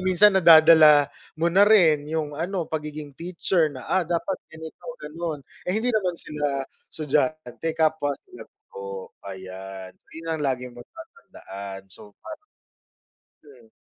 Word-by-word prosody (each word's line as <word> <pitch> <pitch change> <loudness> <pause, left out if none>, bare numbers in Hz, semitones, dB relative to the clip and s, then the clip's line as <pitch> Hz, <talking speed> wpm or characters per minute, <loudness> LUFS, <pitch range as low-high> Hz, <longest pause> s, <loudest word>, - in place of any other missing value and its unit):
minsan 185 +2 +5
nadadala 155 -3 +8 0.3
mo 165 +2 0
na 195 +2 +6
rin 155 -8 +4
'yong 155 -2 -2
ano 175 +2 -2
pagiging 150 -2 -6
teacher 170 -1 0
na, 130 -3 -10
"Ah, 180 -3 0
dapat 175 +2 -2
ganito, 160 0 -11 0.2
ganon," 160 -5 -5 0.2
eh, 190 - +1
hindi 240 +2 0
naman 185 -5 0
sila 145 -3 -2 0.2
estudyante, 155 0 -2
kapwa 155 -2 +1 0.2
sila - - -12
guro, 100 -1 -10 0.2
ayan. 95 0 -9
'Yon 165 0 -12
ang 160 - -3
lagi 125 -2 -2
mong 120 - -12
tatandaan, 100 - -11
so 105 +2 -11
parang 330 +7 -10 1.0
hmm. 125 -6 -18
155 Hz, 135 wpm, -24 LUFS, 135-170 Hz, 1.0 s, nadadala